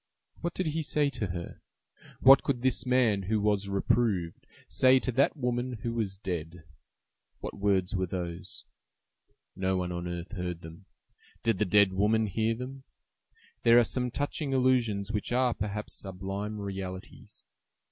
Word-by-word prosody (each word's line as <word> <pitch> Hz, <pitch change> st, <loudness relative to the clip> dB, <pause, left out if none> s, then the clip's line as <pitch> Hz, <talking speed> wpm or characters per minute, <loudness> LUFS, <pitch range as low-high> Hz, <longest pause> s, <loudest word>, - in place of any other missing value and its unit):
What 170 Hz, 0 st, -3 dB
did 185 Hz, -, -1 dB
he 160 Hz, +1 st, -1 dB
say 145 Hz, -1 st, +1 dB
to 105 Hz, -, -3 dB
her? 85 Hz, -1 st, -6 dB, 0.6 s
What 135 Hz, +1 st, +9 dB
could 125 Hz, -3 st, -2 dB
this 130 Hz, -1 st, +1 dB
man, 125 Hz, -6 st, +3 dB
who 105 Hz, +3 st, 0 dB
was 100 Hz, -1 st, +1 dB
reproved, 100 Hz, -3 st, 0 dB, 0.2 s
say 130 Hz, 0 st, +5 dB
to 130 Hz, -, -1 dB
that 135 Hz, +5 st, +2 dB
woman, 125 Hz, -1 st, -1 dB
who 115 Hz, -, -2 dB
was 105 Hz, -5 st, -2 dB
dead? 90 Hz, -3 st, -5 dB, 0.8 s
What -, -, -6 dB
words 100 Hz, -1 st, +1 dB
were 95 Hz, -1 st, 0 dB
those? 90 Hz, +1 st, -6 dB, 0.9 s
No 95 Hz, 0 st, 0 dB
one 90 Hz, -1 st, -2 dB
on 85 Hz, 0 st, -4 dB
earth 85 Hz, +1 st, -5 dB
heard 90 Hz, -4 st, -4 dB
them. 80 Hz, +4 st, -12 dB, 0.6 s
Did 115 Hz, -4 st, +1 dB
the 105 Hz, -, +3 dB
dead 100 Hz, 0 st, +4 dB
woman 105 Hz, +3 st, +2 dB
hear 110 Hz, +3 st, 0 dB
them? 130 Hz, +3 st, -7 dB, 0.8 s
There 115 Hz, 0 st, +6 dB
are 120 Hz, -, +7 dB
some 125 Hz, +2 st, -1 dB
touching 145 Hz, +2 st, -2 dB
illusions 120 Hz, -6 st, +2 dB
which 105 Hz, +1 st, -3 dB
are, 125 Hz, 0 st, +2 dB
perhaps, 105 Hz, +1 st, -4 dB
sublime 95 Hz, +2 st, -5 dB
realities. 95 Hz, -2 st, -7 dB
105 Hz, 155 wpm, -29 LUFS, 95-125 Hz, 0.9 s, What